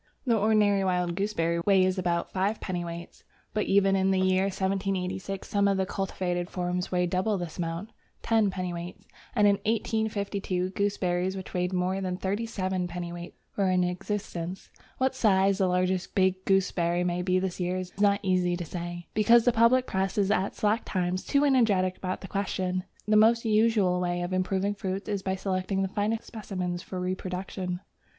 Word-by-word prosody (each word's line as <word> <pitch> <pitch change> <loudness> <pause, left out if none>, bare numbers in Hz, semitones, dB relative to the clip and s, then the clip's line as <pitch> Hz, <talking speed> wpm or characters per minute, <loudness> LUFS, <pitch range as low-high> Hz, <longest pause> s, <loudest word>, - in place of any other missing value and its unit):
The 235 -3 +3
ordinary 210 -2 +3
wild 180 -2 0
gooseberry 170 -4 0
weighs 185 0 +3
about 175 -1 -1
5 200 +3 0
dwt. 170 -2 -5 0.3
But 215 - 0
even 195 0 +4
in 190 0 +2
the 190 -1 +2
year 185 0 +3
1786 190 0 -2
some 200 -1 +2
of 195 -1 +2
the 190 - +1
cultivated 180 -2 -2
forms 180 0 -2
weighed 180 -1 +1
double 190 +3 +1
this 175 -1 -6
amount 170 +5 -3 0.3
(10 220 -3 +3
dwt.), 180 -1 -4 0.4
and 210 -3 +4
in 200 -1 +4
1852 200 -3 -1
gooseberries 190 -2 0
which 190 - -8
weighed 180 0 0
more 185 +1 0
than 180 -1 -2
37 190 -2 -2
dwt. 175 0 -6 0.2
were 195 -2 +2
in 185 -1 +3
existence. 180 -1 -4 0.3
What 260 0 +1
size 195 -5 +3
the 190 - +3
largest 180 0 0
big 190 0 +2
gooseberry 180 -2 +2
may 180 0 0
be 185 0 +1
this 185 -1 -2
year 180 +1 -1
is 185 -1 -5
not 200 0 +4
very 190 -1 +2
easy 180 -1 +1
to 175 - -5
say, 175 +1 -6
because 230 +2 +5
the 245 - +5
public 230 +3 +4
Press 190 -2 -1
is 200 -1 +2
at 195 -1 0
slack 215 +2 +1
times 185 0 -1
too 285 +1 +2
energetic 210 -9 +3
about 185 0 -4
the 190 - -7
question. 185 -2 -2 0.2
The 215 0 +4
most 230 +2 +5
usual 215 -4 +3
way 175 0 -1
of 175 +1 -3
improving 190 +2 0
fruits 195 -1 -4
is 205 -2 -1
by 190 0 -1
selecting 190 0 -1
the - - 0
finest 210 +3 -1
specimens 185 -5 -4
for 185 - -6
reproduction. 185 0 -3
190 Hz, 175 wpm, -28 LUFS, 180-200 Hz, 0.4 s, because